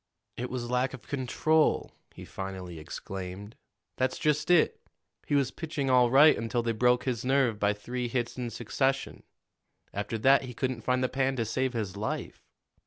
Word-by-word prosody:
"It 125 +1 -4
was 120 -1 -4
lack 125 +2 +1
of 130 - -15
control," 150 +4 +1 0.2
he - - -9
finally 95 -3 -6
exclaimed. 95 +6 -7 0.4
"That's 130 0 0
just 150 +1 0
it. 175 -3 +4 0.5
He 145 - +1
was 135 -2 +2
pitching 150 -5 -3
all 125 -1 +5
right 145 +5 +7
until 115 +1 -1
they 115 - 0
broke 125 +2 +3
his 120 -4 -2
nerve 130 -4 +2
by 105 0 +2
three 120 +4 -4
hits 120 -1 -2
in 125 -2 -3
succession. 135 +4 -1 0.7
After 105 +3 -3
that 135 +5 +5
he 125 -2 -8
couldn't 130 -2 -2
find 125 +2 +1
the - - +3
pan 135 +1 0
to 115 -3 -1
save 130 +3 -1
his 105 -5 -3
life. 105 +2 -4
125 Hz, 175 wpm, -29 LUFS, 115-135 Hz, 0.7 s, right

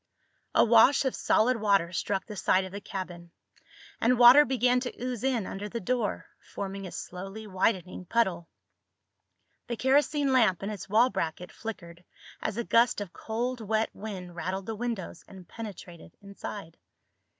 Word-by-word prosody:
A - - +6
wash 235 +5 +5
of 265 - 0
solid 245 +3 +2
water 200 -5 +2
struck 195 +2 -2
the 210 - -8
side 190 -1 +2
of 185 - -9
the 200 +1 -7
cabin, 175 -3 -7 0.7
and 245 +2 +3
water 250 +5 +9
began 250 0 +2
to 250 -1 -5
ooze 250 -2 -4
in 250 -6 0
under 205 +3 -6
the 235 - -4
door, 230 +1 -2
forming 195 -1 -6
a - - -9
slowly 195 +4 -7
widening 185 -2 -1
puddle. 185 -5 0 1.2
The 235 - -3
kerosene 280 +2 +2
lamp 215 -8 +3
in 200 - -3
its 200 -2 -8
wall 230 +5 +4
bracket 180 -2 -3
flickered 175 -6 -8 0.4
as - - -3
a 235 - -1
gust 235 0 +3
of 200 -3 -6
cold 240 +2 -3
wet 220 +1 0
wind 185 -4 -7
rattled 185 +2 -3
the 225 - -4
windows 225 -7 -5
and 185 -3 -13
penetrated 185 -7 -10
inside. 200 -3 -8
210 Hz, 160 wpm, -28 LUFS, 185-235 Hz, 1.2 s, water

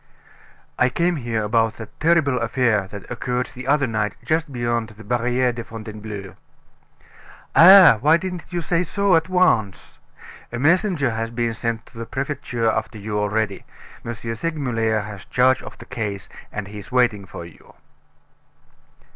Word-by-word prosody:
"I 125 - +4
came 170 +6 0
here 115 -4 -2
about 115 +1 +1
that 115 -2 -11
terrible 155 -6 +3
affair 115 -4 +1
that 100 +2 -10
occurred 125 +1 -2
the 130 +1 -8
other 145 0 +3
night 110 -3 -2
just 160 -1 0
beyond 120 -2 -1
the 110 0 -14
Barriere 125 +2 +1
de 120 0 -6
Fontainebleau." 110 -3 -8 1.2
"Eh! 185 +2 +10
Why 150 +8 +4
didn't 180 -1 -5
you 175 -1 -2
say 170 +1 0
so 200 +1 +2
at 165 +2 +1
once? 120 - +1 0.5
A 120 - -4
messenger 160 - +2
has 115 0 -3
been 115 0 -1
sent 115 0 -3
to 115 - -14
the 115 - -5
prefecture 130 -4 -3
after 110 0 -1
you 105 0 -3
already. 105 -1 -1 0.4
M. 120 0 -5
Segmuller 115 -2 -1
has 105 -2 -9
charge 130 +1 +3
of - - -10
the - - -12
case, 105 -6 -5 0.2
and 105 -1 -5
he's 105 +2 -10
waiting 120 -6 +2
for 85 - -8
you." 85 - -17
120 Hz, 155 wpm, -22 LUFS, 110-140 Hz, 1.2 s, Eh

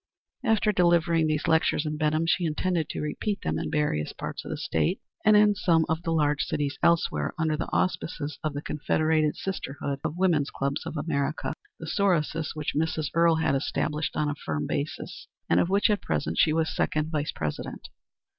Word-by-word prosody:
After 220 -3 +3
delivering 170 -3 +3
these 155 0 0
lectures 160 -1 +2
in 155 0 -2
Benham 155 +1 +1
she 175 +2 +2
intended 165 0 0
to - - -4
repeat 200 +7 -3
them - - -1
in - - -3
various 150 - 0
parts - - -6
of - - -8
the - - -3
State, 80 -1 0 0.2
and 215 0 +6
in 210 0 +6
some 165 -5 +2
of 160 +1 -1
the 170 - -4
large 150 -3 +2
cities 145 -1 -2
elsewhere, 170 -1 +2
under 160 -1 +1
the 150 - -4
auspices 155 -5 -1
of 155 -2 -2
the 145 - -4
Confederated 155 0 +1
Sisterhood 140 -6 -4
of 160 +1 -3
Women's 170 -6 +2
Clubs 140 +1 -2
of 160 - -5
America, 145 -1 -1 0.2
the 160 - -8
Sorosis 165 -4 0
which 150 -1 -2
Mrs. 155 -2 -1
Earle 165 0 +4
had 160 -3 +1
established 150 +1 -1
on 150 - +1
a 145 - 0
firm 75 - -3
basis, 145 +2 -4 0.2
and - - +3
of 175 - +2
which 200 +2 +3
at 210 -2 +1
present 80 +1 -2
she 155 - +5
was 160 0 0
second 155 +1 0
vice 150 -2 -1
president. 75 -2 -5
155 Hz, 190 wpm, -27 LUFS, 150-170 Hz, 0.2 s, and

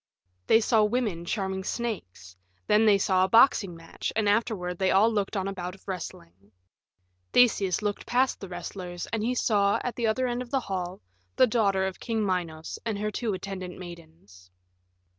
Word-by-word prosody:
They 225 - +6
saw 220 -1 +3
women 210 -6 -1
charming 190 -1 -2
snakes; 180 - -5 0.3
then 215 - +4
they 205 -2 +6
saw 190 -1 +2
a - - +3
boxing 215 -5 +5
match, 165 0 -5
and 215 -1 +1
afterward 205 -5 0
they 190 -1 +2
all 210 +4 +4
looked 205 0 -1
on 190 0 -1
a 195 - -3
bout 180 -1 -5
of 195 - -23
wrestling. 100 - -8 0.8
Theseus 210 -5 +3
looked 205 -1 -3
past 255 +2 +1
the 195 - -8
wrestlers 175 0 -6
and 225 - 0
he 245 +3 0
saw, 200 -4 +2
at 245 - -3
the 235 -2 0
other 255 +4 +1
end 245 0 -1
of 250 - -7
the 270 +1 +1
hall, 185 -3 -4 0.3
the - - +6
daughter 200 -5 +1
of 190 -1 -4
King 225 -3 -1
Minos 170 -4 -3
and 225 -3 -2
her 210 +1 -2
two 225 -1 -2
attendant 185 -1 -6
maidens. 160 - -13
195 Hz, 180 wpm, -27 LUFS, 180-225 Hz, 0.8 s, They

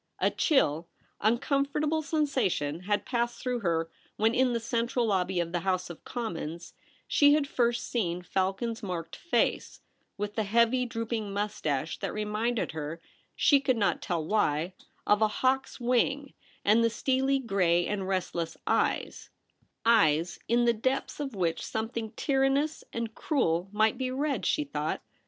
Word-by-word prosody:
A - - +2
chill, 170 - +2 0.3
uncomfortable 280 +7 +1
sensation 260 - 0
had 205 +1 0
passed 240 -1 -1
through 250 -1 -2
her 165 -5 0 0.3
when. 220 +2 +2
In 255 0 +3
the 235 - 0
central 235 +1 0
lobby 190 -3 +1
of 170 -1 -1
the 175 - 0
House 185 0 -1
of 165 - -12
Commons, 170 -8 -5 0.3
she 290 0 +5
had 295 -2 +1
first 240 -3 0
seen 180 -7 -1
Falcon's 195 +6 -1
marked 175 -5 -5
face, 345 - 0 0.4
with 205 +1 -3
the 220 - 0
heavy 235 +4 +2
droop 230 0 -4
ing 215 -3 -2
moustache 170 -8 -2
that - - -3
reminded 215 +2 -1
her, 160 +1 -5 0.4
she 285 - +5
could 260 -3 +1
not 205 -2 +1
tell 170 -3 -2
why, 165 -3 +1 0.3
of 210 +1 +3
a 215 - +5
hawk's 260 +6 0
wing; 260 +3 +1 0.3
and 220 +3 +5
the 230 - +4
steely 265 +4 +1
gray 185 -8 +2
and 195 -2 -2
restless 175 -3 -2
eyes - - 0 0.3
— - - -37 0.2
eyes 175 -7 +3
In 240 +1 +3
the 235 - +4
depths 260 +7 -2
of 275 -5 -4
which 170 -4 -1
something 220 0 -3
tyrannous 275 +2 +1
and 230 -1 -4
cruel 185 - 0
might 215 +3 +2
be 260 -1 -1
read, 275 +2 -1
she 300 - +1
thought. 290 - -3
225 Hz, 155 wpm, -29 LUFS, 185-255 Hz, 0.4 s, she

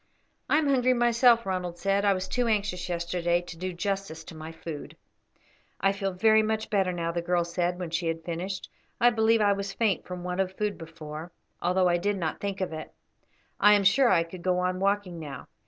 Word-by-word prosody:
"I - - +4
am 310 -2 +2
hungry 255 -2 +3
myself," 240 -1 +4
Ronald 180 -2 -3
said 195 +2 +1
"I 200 - +5
was 185 0 -3
too 245 -1 0
anxious 200 -5 -1
yesterday 175 0 0
to 175 -1 -9
do 185 +2 -4
justice 195 -3 -3
to 160 - -11
my 155 +1 -7
food." 165 -2 -8 0.8
"I 195 - +3
feel 195 -1 -2
very 220 +4 +4
much 220 0 -2
better 195 -3 +2
now," 170 -1 -2
the 170 0 -2
girl 175 0 +1
said 175 +1 -1
when 175 -3 -5
she 170 0 -1
had 165 0 -2
finished. 180 +3 -4 0.3
"I 240 +1 +6
believe 225 0 +3
I 205 -1 +4
was 200 0 -4
faint 210 -3 +1
from 180 -1 -6
want 180 +1 -1
of 190 0 -3
food 210 -1 -1
before, 160 0 -8 0.3
although 180 +1 +2
I 175 0 +3
did 205 +3 0
not 165 -4 -3
think 200 -1 -3
of 185 -3 -2
it. 155 0 -7 0.7
I 210 - +7
am 205 - +2
sure 240 +7 +5
I 170 -5 +4
could 170 +2 -10
go 180 0 +1
on 180 0 0
walking 195 -3 0
now. 145 -3 -8
185 Hz, 215 wpm, -27 LUFS, 170-205 Hz, 0.8 s, I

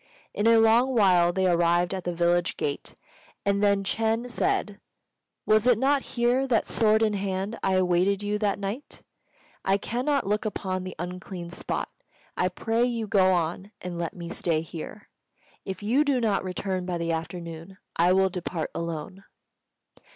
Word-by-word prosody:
In 205 - +1
a 230 0 +6
little 230 +4 +4
while 180 -5 +5
they 190 +1 0
arrived 175 0 +2
at 190 -2 -5
the 175 - 0
village 175 0 +1
gate, 145 -1 -4 0.5
and 200 0 +1
then 200 -1 +3
Ch'êng 225 +4 -1
said, 205 -3 -1 0.7
"Was 215 +2 +3
it 245 -3 +5
not 275 +3 +2 0.2
here 245 +3 +2
that, 235 -4 +2
sword 220 0 +3
in 215 -1 +2
hand, 195 +1 -3
I 190 - +1
awaited 185 +2 +2
you 210 0 -1
that 205 -2 0
night? 200 +8 -6 0.6
I 195 +1 +2
cannot 255 +7 -1
look 210 +2 0
upon 185 -3 -3
the 185 - -7
unclean 180 0 -6
spot. - - -3 0.5
I 180 - +1
pray 225 +5 0
you 235 -2 -1
go 190 -3 +3
on, 180 +4 -1
and 175 -1 -6
let 170 -1 -3
me 170 -2 -7
stay 165 -2 0
here. 165 +5 -8 0.6
If 190 +1 -6
you 250 +8 +3
do 280 -4 +1
not 215 -5 +1
return 185 0 -3
by 180 -1 -1
the 170 0 -2
afternoon, 165 +2 -6 0.2
I 175 +2 +4
will 190 0 +3
depart 175 -2 -4
alone." 170 +3 -5
195 Hz, 165 wpm, -26 LUFS, 175-220 Hz, 0.7 s, a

